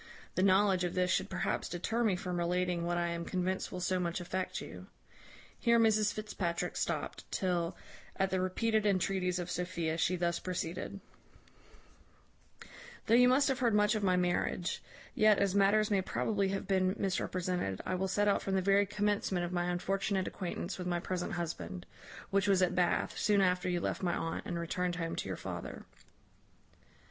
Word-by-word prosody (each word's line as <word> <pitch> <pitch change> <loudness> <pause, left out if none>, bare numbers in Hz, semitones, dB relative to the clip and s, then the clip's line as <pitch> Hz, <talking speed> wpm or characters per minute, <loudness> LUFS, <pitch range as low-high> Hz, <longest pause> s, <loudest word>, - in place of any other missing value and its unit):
The - - 0
knowledge 190 -1 +4
of 175 - -2
this 180 -1 +2
should - - +1
perhaps 185 - -2
deter 225 +7 -1
me 210 -5 +3
from 180 -1 -3
relating 175 0 0
what 175 0 0
I 175 0 0
am 170 0 -3
convinced 185 +1 -2
will 185 - -5
so 185 +1 0
much 175 -1 -1
affect 185 +1 -3
you." - - -9 0.7
Here 235 -1 +4
Mrs 215 -2 +4
Fitzpatrick 195 -6 -3
stopt, - - -2
till, 175 -2 -1 0.4
at 190 -1 0
the 185 -1 +1
repeated 215 +3 +1
entreaties 185 -1 +1
of 180 0 -4
Sophia, 170 -3 -2
she 180 +2 +2
thus 170 -1 0
proceeded: 185 +2 -4 2.0
"Though 225 - +2
you 250 +1 +7
must 265 +3 +4
have 270 -1 0
heard 235 -4 +2
much 210 +1 +4
of 215 - -1
my 185 -2 +3
marriage; 175 0 0 0.3
yet, 215 -1 +5
as 200 -2 +1
matters 205 +2 +3
may 195 -2 +3
probably 200 +1 0
have 195 0 -2
been 190 -1 +2
misrepresented, 180 - -1
I - - -1
will 185 +1 0
set 205 +2 +1
out 200 - +3
from 195 - -1
the 190 - +2
very 200 +1 +4
commencement 205 -3 0
of 175 - -5
my 175 -1 0
unfortunate 190 +2 -1
acquaintance 180 0 -4
with 180 - -4
my 175 -1 0
present 180 0 -3
husband; 90 - -4 0.5
which 200 0 +2
was 190 -2 +4
at 180 0 +2
Bath, 180 -1 +1
soon 210 -1 +3
after 180 -1 +2
you 175 -1 0
left - - -2
my 175 -2 0
aunt, 165 - -3
and 175 - -2
returned 175 +1 -1
home 165 -2 -3
to - - -3
your 95 - -3
father. 90 -2 -6
185 Hz, 180 wpm, -32 LUFS, 175-200 Hz, 2.0 s, you